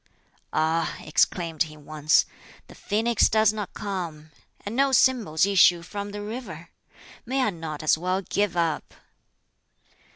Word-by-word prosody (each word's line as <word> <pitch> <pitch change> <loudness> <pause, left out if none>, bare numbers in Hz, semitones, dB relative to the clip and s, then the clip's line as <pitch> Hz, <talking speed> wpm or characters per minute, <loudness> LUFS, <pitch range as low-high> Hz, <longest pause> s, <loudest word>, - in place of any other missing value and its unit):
"Ah!" 160 +1 0
exclaimed 165 0 0
he 155 - -13
once, 150 0 +2 0.4
"the - - -15
phoenix 225 +2 +1
does 215 0 +3
not 210 -3 -5
come! 170 -7 -5 0.3
and 205 +3 -5
no 275 +1 +3
symbols 230 - +3
issue 180 -3 +4
from 200 +3 -6
the 205 0 -6
river! 205 -7 -7 0.5
May 260 +2 -1
I 215 - +1
not 160 -3 -7
as 155 +1 +3
well 185 +3 -1
give 200 -2 -1
up?" 165 -2 -1
185 Hz, 135 wpm, -25 LUFS, 160-210 Hz, 0.5 s, issue